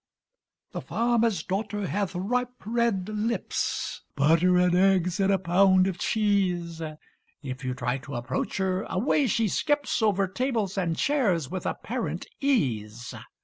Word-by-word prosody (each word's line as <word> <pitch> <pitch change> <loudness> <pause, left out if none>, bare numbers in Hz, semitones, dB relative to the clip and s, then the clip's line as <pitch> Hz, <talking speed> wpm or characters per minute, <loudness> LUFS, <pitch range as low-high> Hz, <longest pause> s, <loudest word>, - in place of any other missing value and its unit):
The - - -5
farmer's 230 -6 +1
daughter 205 +1 -2
hath 195 0 -2
ripe 245 +7 -1
red 225 -4 0
lips; 215 0 -2
(Butter 165 +5 +4
and 180 0 +3
eggs 185 -1 +3
and 195 0 +3
a 195 - +4
pound 185 +1 +4
of 185 -2 -2
cheese) 185 -6 0 0.6
If 130 -1 -6
you 125 0 -2
try 125 +1 -2
to 140 +1 -8
approach 120 0 -3
her, 190 -1 0
away 260 +7 +1
she 225 0 +1
skips 290 - 0
Over 200 -3 +2
tables 220 -1 -1
and 175 -4 -1
chairs 200 - +1
with 185 -1 -3
apparent - - -3
ease. 120 - -1
190 Hz, 140 wpm, -27 LUFS, 170-220 Hz, 0.6 s, Butter